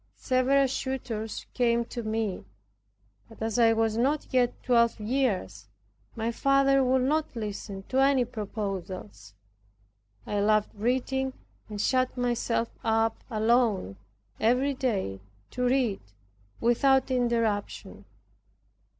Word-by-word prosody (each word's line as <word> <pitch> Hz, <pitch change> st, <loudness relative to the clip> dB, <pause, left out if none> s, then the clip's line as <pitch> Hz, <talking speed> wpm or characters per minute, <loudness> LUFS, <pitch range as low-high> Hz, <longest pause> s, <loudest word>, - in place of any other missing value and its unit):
Several 265 Hz, +2 st, +2 dB
suitors 250 Hz, -5 st, -4 dB
came 235 Hz, -1 st, +2 dB
to 240 Hz, -, -6 dB
me; 215 Hz, -3 st, -2 dB, 0.9 s
but -, -, -15 dB
as 225 Hz, +2 st, -1 dB
I 225 Hz, -1 st, +5 dB
was 225 Hz, -1 st, +1 dB
not 280 Hz, +5 st, +1 dB
yet 245 Hz, -2 st, +1 dB
twelve 235 Hz, -2 st, +3 dB
years 210 Hz, -, -1 dB, 0.5 s
my 230 Hz, +1 st, -1 dB
father 275 Hz, +2 st, +3 dB
would 255 Hz, 0 st, +2 dB
not 300 Hz, +1 st, 0 dB
listen 205 Hz, -3 st, -5 dB
to 260 Hz, -, +1 dB
any 270 Hz, -2 st, +4 dB
proposals. 190 Hz, -, -6 dB, 0.9 s
I 205 Hz, -, -2 dB
loved 215 Hz, +1 st, +2 dB
reading 260 Hz, +4 st, -1 dB, 0.4 s
and 210 Hz, -1 st, -6 dB
shut 255 Hz, +3 st, +1 dB
myself 240 Hz, -1 st, 0 dB
up 225 Hz, 0 st, +1 dB
alone 220 Hz, -, +1 dB, 0.4 s
every 250 Hz, +5 st, +2 dB
day 200 Hz, -, -2 dB, 0.3 s
to 250 Hz, 0 st, -2 dB
read 245 Hz, -5 st, +1 dB, 0.6 s
without 265 Hz, +3 st, +3 dB
interruption. 225 Hz, -, -1 dB
235 Hz, 110 wpm, -27 LUFS, 215-255 Hz, 0.9 s, I